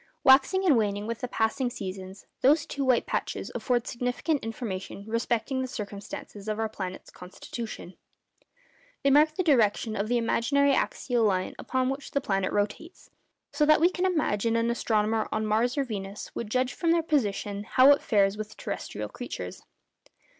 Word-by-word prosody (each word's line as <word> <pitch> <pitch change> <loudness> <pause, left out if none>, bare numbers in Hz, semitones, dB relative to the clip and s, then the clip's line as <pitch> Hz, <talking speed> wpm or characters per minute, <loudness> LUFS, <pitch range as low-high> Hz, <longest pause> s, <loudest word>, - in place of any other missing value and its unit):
Waxing 280 +9 +5
and 315 -7 +5
waning 205 -1 -1
with 230 0 -4
the 250 - -3
passing 240 +3 0
seasons, 190 -3 -7 0.2
those 295 +3 +4
two 285 -3 -3
white 255 -3 +3
patches - - -3
afford 245 -2 0
significant 250 +5 -1
information 205 -3 -5
respecting 230 +3 -1
the 260 - -2
circumstances 210 0 -7
of 215 0 -1
our 225 0 0
planet's 190 -4 -7
constitution. 190 +1 -8 1.1
They 275 - +4
mark 305 +2 +5
the 370 - 0
direction 225 - +2
of 200 +2 -1
the 245 +1 +1
imaginary 275 +5 +2
axial 245 -2 0
line 185 -3 +1
upon 260 -1 -1
which 270 +1 -4
the 280 - 0
planet 195 -7 -1
rotates; 205 - -3 0.4
so 300 - +1
that 310 - +6
we 345 +3 +4
can 370 +1 0
imagine 230 - 0
that 230 - +2
an 230 +1 +1
astronomer 220 -1 0
on 215 0 -1
Mars 230 +5 +1
or 280 - +2
Venus 200 -4 -6
would 225 - -5
judge 255 +3 0
from 335 - -1
their 335 0 +3
position 205 -9 -1
how 255 +5 +6
it 285 - +4
fares 200 -1 +2
with 215 0 -7
terrestrial - - -5
creatures. - - -7
230 Hz, 170 wpm, -27 LUFS, 210-275 Hz, 1.1 s, that